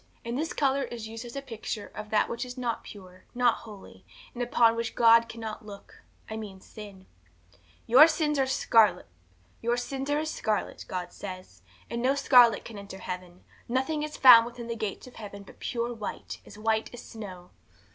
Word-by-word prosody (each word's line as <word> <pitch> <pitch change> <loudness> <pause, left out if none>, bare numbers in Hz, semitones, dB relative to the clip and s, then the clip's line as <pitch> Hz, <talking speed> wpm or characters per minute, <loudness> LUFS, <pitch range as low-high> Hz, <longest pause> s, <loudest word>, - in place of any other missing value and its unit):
And 235 +1 -3
this 315 +5 -2
colour 275 -1 +1
is 235 -4 -5
used 225 +2 -8
as 235 - -9
a 275 - -4
picture 225 -4 -6
of 210 - -7
that 210 -1 +2
which 235 +1 -4
is 250 0 -8
not 240 -3 -2
pure, 185 -2 -13
not 245 -2 +3
holy, 210 -3 -13 0.3
that 245 - -6
upon 235 -1 +3
which 230 0 -3
God 230 0 +6
cannot 225 -2 -7
look 200 -1 -12 0.3
I 220 - -5
mean 205 -3 -8
sin. 200 -1 -12 0.8
'Your 265 +7 +8
sins 300 -3 0
are 265 -1 +1
as - - 0
scarlet, 225 -5 +4 1.8
God 180 -1 -5
says; 185 - -9 0.3
and 235 - -4
no 265 +3 +2
scarlet 250 -4 +5
can 220 -3 -8
enter 200 -1 -9
heaven; 180 -1 -7 0.3
nothing 265 +5 0
is 300 0 -5
found 235 -3 +9
within 240 0 -8
the 230 0 -4
gates 215 -3 -4
of 255 - -14
heaven 200 -2 -9
but - - -16
pure 240 0 -2
white, 220 -3 -6
as - - -12
white 220 0 0
as 245 - -10
snow. 185 -5 -10
230 Hz, 175 wpm, -28 LUFS, 205-245 Hz, 1.8 s, found